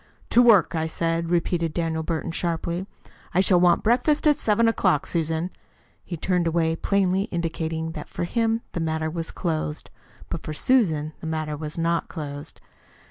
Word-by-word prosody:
"To 245 - +6
work, 225 -7 +5
I 160 -1 0
said," 165 +1 -1
repeated 170 -1 0
Daniel 165 -2 -1
Burton 165 +1 -3
sharply. 170 +2 -2 0.5
"I - - +5
shall 185 -1 +4
want 175 -1 +4
breakfast 250 +8 +2
at 300 -1 +6
seven 230 -4 +2
o'clock, 185 -9 +2
Susan." 165 +1 -1 0.5
He 170 - -6
turned 180 +1 +1
away 165 -1 +1
plainly 195 +1 +1
indicating 165 -3 -3
that 160 - -8
for - - -4
him 225 +4 0
the - - -4
matter 160 -1 -1
was 165 0 -3
closed. 155 -3 -3 0.4
But 165 - -4
for 155 - -5
Susan 160 - +2
the 160 - -6
matter 155 -1 -2
was 150 +1 -6
not 165 0 0
closed. 145 -3 -7
170 Hz, 165 wpm, -24 LUFS, 160-185 Hz, 0.5 s, To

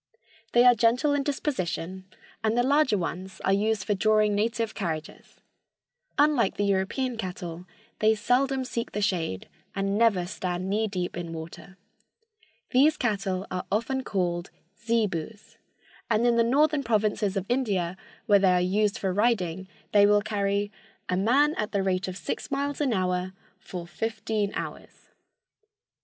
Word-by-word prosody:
They 240 +1 +6
are 250 - +8
gentle 240 +6 +2
in 285 - +1
disposition 190 - -3 0.4
and 220 +1 +1
the 245 - +4
larger 275 -4 +3
ones 185 +1 -5
are 195 - +3
used 210 0 +1
for 205 - 0
drawing 215 +1 +3
native 225 +2 0
carriages. 160 -6 -5 0.8
Unlike 290 -8 +3
the 205 - +1
European 200 +6 0
cattle, 180 -3 -6 0.3
they 220 +1 +4
seldom 260 +4 +1
seek 235 -2 -4
the 210 - -2
shade, 165 - -1 0.3
and 195 +1 0
never 210 -6 +3
stand 180 -1 -3
knee 215 +3 +1
deep 180 -3 -3
in 170 -1 -5
water. 170 +4 -9 0.9
These 285 +5 +4
cattle 195 -5 -1
are 180 0 -4
often 245 +6 0
called 175 -5 -2 0.3
zebus, 215 -4 -2 0.5
and 230 +1 +2
in 240 -1 +4
the 230 - +4
northern 290 +5 +3
provinces 215 -4 0
of 195 - -2
India, 200 -9 0 0.3
where 205 -4 +5
they 190 -2 +4
are 180 - +3
used 205 +4 +1
for 190 -2 -1
riding, 190 -4 0 0.2
they 205 -1 +6
will 205 0 +4
carry 205 -1 -1 0.4
"a 180 - +1
man 260 +10 +3
at 210 0 -2
the 200 -1 +1
rate 185 -1 0
of 185 0 -5
six 165 - -4
miles 280 +1 -2
an 280 -4 +1
hour 185 -2 -1 0.3
for 180 -2 -7
fifteen 215 +1 -2
hours." - - -7
205 Hz, 150 wpm, -27 LUFS, 185-235 Hz, 0.9 s, are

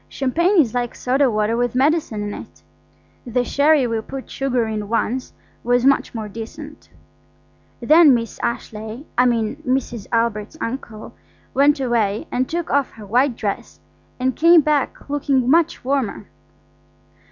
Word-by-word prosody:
Champagne 340 +9 +1
is 245 -9 +3
like 245 -1 -2
soda 265 +2 +1
water 215 0 0
with 245 0 -1
medicine 270 -6 +1
in 205 0 -4
it. - - -11 0.6
The 245 0 -1
sherry 285 +1 +3
we 230 -2 -1
put 270 +4 -8
sugar 255 -4 0
in 215 -2 -4
once 235 +2 -1 0.3
was 245 +1 +2
much 275 -2 +2
more 220 -2 -4
decent. 230 +8 -9 0.9
Then 300 +2 +6
Miss 230 -1 -4
Ashleigh–I 235 +3 -3
mean 230 +1 0
Mrs. 255 -7 -2
Albert's 230 +2 -1
uncle–went 270 +4 -2
away 225 -5 0
and 255 +1 -1
took 340 0 -3
off 280 -1 +2
her 215 -2 -11
white 245 +5 +2
dress 205 -3 -5 0.4
and 255 0 0
came 335 0 +6
back 295 -2 -1
looking 280 -3 0
much 330 0 +2
warmer. 270 -5 -1
250 Hz, 140 wpm, -20 LUFS, 225-280 Hz, 0.9 s, Then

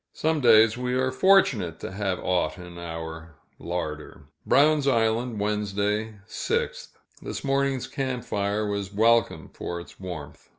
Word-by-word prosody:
Some 160 -1 0
days, 115 -1 +6
we 125 0 -1
are 130 0 +1
fortunate 120 - +3
to - - -5
have 95 -1 -2
aught 90 -3 0
in 90 -1 -10
our 80 -1 -7 0.2
larder. 75 -4 -5 0.2
Brown's 145 0 +4
Island, 115 -2 +1
Wednesday, 105 +1 -1
6th. - - -2 0.3
This - - -6
morning's 135 -1 0
camp 130 -3 -3
fire 100 +1 -1
was 100 -1 -3
welcome 115 +2 +2
for 85 - -5
its 85 - -13
warmth. 90 -6 -8
105 Hz, 135 wpm, -26 LUFS, 90-125 Hz, 0.3 s, days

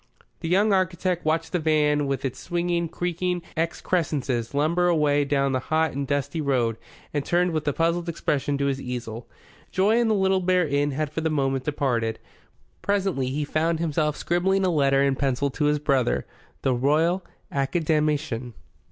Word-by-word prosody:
The 165 - -4
young 200 +4 +3
architect 185 -2 0
watched 160 +1 0
the 180 - 0
van 150 -2 +2
with 135 -1 -2
its 130 - -3
swinging, 175 -1 -1
creaking 175 +1 -2
excrescences 150 -7 -1
lumber 170 +5 +2
away 150 -4 +3
down 140 -1 +1
the 130 - +1
hot 160 +3 0
and 140 0 -3
dusty 140 +3 -1
road, 125 -6 +1 0.4
and 145 -2 0
turned 175 +3 +1
with 155 -2 -2
a - - +4
puzzled 170 +3 0
expression 145 -3 -1
to 140 - 0
his 135 -1 -1
easel. 120 -2 -6 0.4
Joy 205 +4 +2
in 235 - +2
the 220 - +3
Little 190 -1 +2
Bear 180 -2 +2
Inn 145 0 +1
had 145 +1 -2
for 160 - -3
the 160 - 0
moment 135 -3 0
departed. 120 -6 0 0.6
Presently 195 -10 0
he 145 +3 -2
found 160 +2 0
himself 155 -2 0
scribbling 190 +3 +1
a 185 - +2
letter 140 -3 +3
in 140 -1 +2
pencil 140 0 0
to 150 - -1
his 150 0 +3
brother, 135 -4 +1 0.4
the 130 - +2
Royal 155 +9 +2 0.3
Academician. 150 -4 0
150 Hz, 170 wpm, -25 LUFS, 140-170 Hz, 0.6 s, a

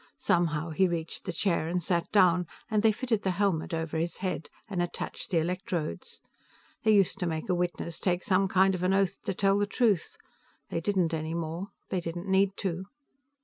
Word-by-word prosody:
Somehow, 165 -2 +1
he 190 +4 +3
reached 165 -2 -4
the 180 - -2
chair 170 -2 0
and 175 +2 -1
sat 170 0 -1
down, 180 -4 +4 0.2
and 215 -1 +3
they 220 0 +5
fitted 225 -1 -1
the 190 - 0
helmet 195 -5 +1
over 160 -1 -2
his 170 +1 -2
head 185 -4 -3 0.2
and 190 -5 -2
attached 175 - -4
the 180 - +1
electrodes. 175 - -2 0.6
They 220 - +2
used 200 -2 +4
to 180 - 0
make 160 +2 -3
a - - +3
witness 175 -1 -2
take 180 -1 0
some 190 0 +3
kind 190 +1 +4
of 180 - -3
an 185 +1 +2
oath 195 -2 +1
to 195 - -1
tell 195 +1 +3
the 205 - +1
truth. 215 -6 +1 0.5
They 165 - -1
didn't 180 -3 +1
any 160 +1 -2
more. 170 +3 -3 0.2
They 185 - -1
didn't 175 +2 -5
need 195 0 +3
to. 185 -1 -2
180 Hz, 195 wpm, -29 LUFS, 165-195 Hz, 0.6 s, they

